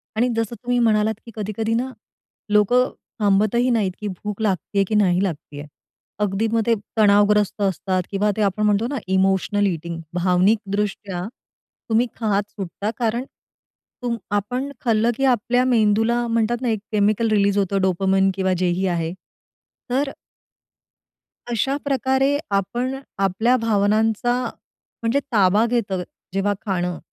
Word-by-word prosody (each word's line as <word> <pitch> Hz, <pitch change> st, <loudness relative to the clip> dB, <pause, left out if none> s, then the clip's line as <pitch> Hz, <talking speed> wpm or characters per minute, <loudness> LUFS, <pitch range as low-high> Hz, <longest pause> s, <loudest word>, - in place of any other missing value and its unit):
आणि 235 Hz, +3 st, +2 dB
जसं 225 Hz, 0 st, -2 dB
तुम्ही 245 Hz, 0 st, -2 dB
म्हणालात 220 Hz, -2 st, +3 dB
की 230 Hz, -, -10 dB
कधी-कधी 220 Hz, +1 st, -2 dB
ना, 255 Hz, +3 st, -1 dB, 0.6 s
लोकं 245 Hz, +5 st, +4 dB, 0.3 s
थांबतही 215 Hz, +4 st, +2 dB
नाहीत 215 Hz, -6 st, +1 dB
की 210 Hz, -, -3 dB
भूक 205 Hz, +2 st, -5 dB
लागत 195 Hz, -5 st, +1 dB, 0.2 s
आहे 200 Hz, -, +4 dB
की 215 Hz, -, -1 dB
नाही 190 Hz, -3 st, +3 dB
लागत 160 Hz, -6 st, -4 dB
आहे. 145 Hz, +1 st, -7 dB, 0.6 s
अगदी 200 Hz, +3 st, 0 dB
मग 230 Hz, 0 st, +2 dB
ते 235 Hz, -, +3 dB, 0.2 s
तणावग्रस्त 205 Hz, -1 st, +4 dB
असतात 190 Hz, -1 st, 0 dB
किंवा 205 Hz, +1 st, +1 dB
ते -, -, 0 dB
आपण 205 Hz, +1 st, +1 dB
म्हणतो 210 Hz, +2 st, +2 dB
ना, 280 Hz, +2 st, -3 dB
इमोशनल 190 Hz, +2 st, +2 dB
ईटिंग 170 Hz, -2 st, -4 dB
भावनिकदृष्ट्या 195 Hz, +1 st, 0 dB, 0.6 s
तुम्ही 230 Hz, +2 st, +3 dB
खात 210 Hz, -3 st, 0 dB
सुटता. 200 Hz, +2 st, -4 dB
कारण 235 Hz, +2 st, 0 dB, 0.8 s
तुम 235 Hz, -1 st, -1 dB, 0.2 s
आपण 250 Hz, +7 st, -2 dB
खाल्लं 230 Hz, 0 st, +2 dB
की 270 Hz, -, +1 dB
आपल्या 245 Hz, 0 st, +2 dB
मेंदूला 230 Hz, 0 st, +2 dB
म्हणतात 230 Hz, +1 st, 0 dB
ना 250 Hz, -, 0 dB
एक 220 Hz, -2 st, 0 dB
केमिकल 215 Hz, +2 st, +2 dB
रिलीज 200 Hz, -1 st, +3 dB
होतं 195 Hz, 0 st, +1 dB
डोपामाइन 190 Hz, +1 st, +2 dB
किंवा 190 Hz, -1 st, +1 dB
जे 185 Hz, -, +2 dB
ही 185 Hz, +2 st, 0 dB
आहे. 170 Hz, -2 st, -1 dB, 0.8 s
तर 270 Hz, +3 st, +1 dB, 1.4 s
अशाप्रकारे 270 Hz, +2 st, +1 dB, 0.2 s
आपण 240 Hz, +7 st, -1 dB, 0.3 s
आपल्या, 220 Hz, +6 st, +2 dB
भावनांचा 220 Hz, +1 st, +1 dB, 0.7 s
म्हणजे 230 Hz, +4 st, +1 dB
ताबा 205 Hz, 0 st, +4 dB
घेतं 225 Hz, -6 st, -1 dB, 0.3 s
जेव्हा 195 Hz, +1 st, +1 dB
खाणं, 180 Hz, -3 st, -1 dB
210 Hz, 135 wpm, -22 LUFS, 195-235 Hz, 1.4 s, लोकं